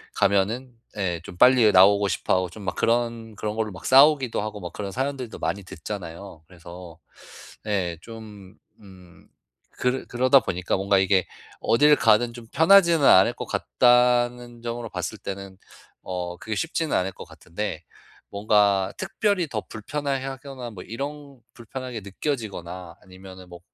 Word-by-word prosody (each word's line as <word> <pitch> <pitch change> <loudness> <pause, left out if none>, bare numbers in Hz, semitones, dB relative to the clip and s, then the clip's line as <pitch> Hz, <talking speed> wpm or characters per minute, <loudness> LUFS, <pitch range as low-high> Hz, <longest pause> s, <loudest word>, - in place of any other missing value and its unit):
가면은 110 +6 +1 0.2
예 90 -4 -2
좀 90 - -11
빨리 125 -1 +6
나오고 100 +2 +5
싶어 - - 0
하고 90 -1 0
좀 105 +4 -11
막 90 - -3
그런 115 -1 -1
그런 105 +2 -3
걸로 110 -1 -2
막 90 -3 -11
싸우기도 135 -3 +5
하고 105 0 -5
막 90 -1 -7
그런 100 -2 -5
사연들도 130 0 -4
많이 100 0 -3
듣잖아요. 90 -1 -8
그래서. 85 -1 -12 0.7
예, 90 -5 -1
좀 105 -4 -12 0.3
음 90 -3 -17 0.5
그러 125 +1 -1
그러다 130 +3 +4
보니까 90 0 -2
뭔가 100 0 +2
이게 95 -1 +2 0.4
어딜 150 +5 +5
가든 115 -1 +3
좀 120 -1 -11
편하지는 170 -1 +5
않을 95 -6 +6
것 - - -7
같다는 120 -1 +2
점으로 120 0 -4
봤을 90 -6 -5
때는 100 -1 -7 0.5
어 90 -1 -5
그게 110 +3 -5
쉽지는 165 +3 -1
않을 95 +1 -1
것 - - -10
같은데 105 +5 -6 0.5
뭔가 100 -2 +2
특별히 195 -2 0
더 110 -7 -4
불편해하거나 135 +1 -5
뭐 90 -4 -10
이런 140 +2 -7
불편하게 125 0 -7
느껴지거나 95 - -5
아니면은 95 0 -13
뭐 85 0 -11
105 Hz, 310 characters per minute, -24 LUFS, 95-125 Hz, 0.7 s, 빨리